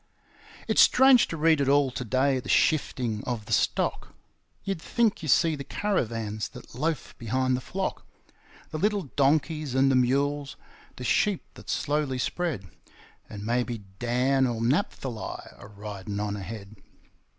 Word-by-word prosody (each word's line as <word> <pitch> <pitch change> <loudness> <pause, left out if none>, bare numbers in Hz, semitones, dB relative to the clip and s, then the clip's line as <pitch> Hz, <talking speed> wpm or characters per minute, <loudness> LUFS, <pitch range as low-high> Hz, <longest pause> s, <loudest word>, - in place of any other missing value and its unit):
It's - - +5
strange 265 -2 +6
to 165 - -5
read 160 -1 +4
it 135 - +1
all 140 -1 +4
to 125 - -4
day, 130 +3 +1
the - - -9
shifting 125 -8 +1
of 120 -4 -3
the - - -3
stock; - - 0 0.5
You'd 195 -4 -3
think 230 +1 +1
you 155 - -5
see 160 +3 +4
the 140 - -6
caravans 115 - -2
that - - -13
loaf 150 +3 -2
behind 130 +3 0
the 125 - -3
flock, 190 +9 -3 0.7
The 155 - -3
little 205 -6 0
donkeys 150 0 +1
and 135 +1 +4
the - - +3
mules, 140 +3 +1 0.4
the 125 - -8
sheep 200 - +1
that - - -13
slowly 145 -3 0
spread, 130 - -2 0.6
And 105 0 -7
maybe 120 -1 -1 0.2
Dan 130 +3 +2
or 120 -2 -2
Naphthali 125 - -2
a 100 - -11
ridin' 100 -1 -6
on 105 -1 -2
ahead. 100 +1 -8
130 Hz, 150 wpm, -27 LUFS, 115-155 Hz, 0.7 s, strange